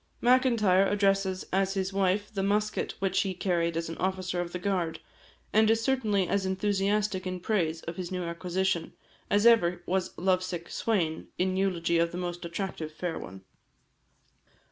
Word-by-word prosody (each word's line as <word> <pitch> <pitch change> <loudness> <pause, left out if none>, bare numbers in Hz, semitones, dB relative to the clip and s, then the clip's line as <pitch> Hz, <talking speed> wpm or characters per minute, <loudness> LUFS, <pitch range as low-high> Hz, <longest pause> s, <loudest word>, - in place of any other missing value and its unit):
Macintyre 235 -7 +4
addresses 195 -2 +1
as 195 +1 +1
his 190 0 -1
wife 195 +2 0
the 195 - -1
musket 210 +2 0
which 190 -1 +1
he 190 -2 -2
carried 170 -3 0
as 165 - -2
an 165 - -7
officer 185 -1 -1
of 175 -1 -5
the 180 - -3
guard; 180 -3 -1 0.5
and 220 0 +5
is 225 0 +2
certainly 215 -8 +1
as 200 -1 0
enthusiastic 195 0 0
in 185 0 -3
praise 170 -5 -1
of 170 0 -6
his 180 -1 -5
new 180 -1 -2
acquisition, 175 +1 -1 0.4
as 205 +2 +3
ever 200 -7 +4
was 185 0 -1
love 185 0 +2
sick 175 -2 -5
swain 170 -8 -1
in 185 +1 +1
eulogy 170 -3 +1
of 170 0 +2
the 175 - -5
most 175 -1 -4
attractive 170 -2 -4
fair 165 +1 -4
one. 95 +1 -10
190 Hz, 165 wpm, -28 LUFS, 175-200 Hz, 0.5 s, and